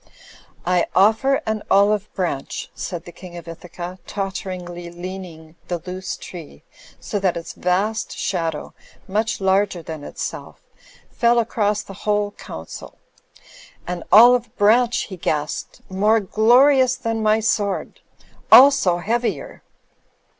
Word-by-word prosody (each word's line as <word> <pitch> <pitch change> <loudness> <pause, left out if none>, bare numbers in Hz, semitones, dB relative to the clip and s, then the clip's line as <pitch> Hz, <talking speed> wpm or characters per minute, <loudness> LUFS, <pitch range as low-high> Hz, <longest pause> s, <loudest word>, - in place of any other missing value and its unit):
"I 180 -1 +2
offer 220 +8 +3
an 220 -1 -2
olive 205 +1 +3
branch," 170 -8 -3
said 175 -2 -6
the 175 - -10
King 175 0 -11
of 170 - -10
Ithaca, 175 +2 -8
totteringly 185 -3 -5
leaning 175 -2 -9
the 175 - -2
loose 185 0 -5
tree 160 - -11 0.4
so 205 - -3
that 185 -3 0
its 165 - -7
vast 205 +4 -1
shad 165 -4 -1
ow, - - -9 0.3
much 215 +3 -1
larger 190 -2 +1
than 160 -2 -7
itself, - - -7 0.5
fell 240 0 +2
across 210 -3 0
the 195 - -11 0.2
whole 205 0 +1
council. 80 - -10 0.9
"An 175 -1 -4
olive 240 +3 +6
branch," 230 +4 +3
he 190 - -8
gasped, 150 -3 -3
"more 210 +4 +2
glorious 255 +6 +4
than 225 -3 -3
my 215 0 +3
sword. 210 - -1 0.5
Also 265 -10 +7
heavier." 240 - -2
195 Hz, 125 wpm, -21 LUFS, 175-220 Hz, 0.9 s, Also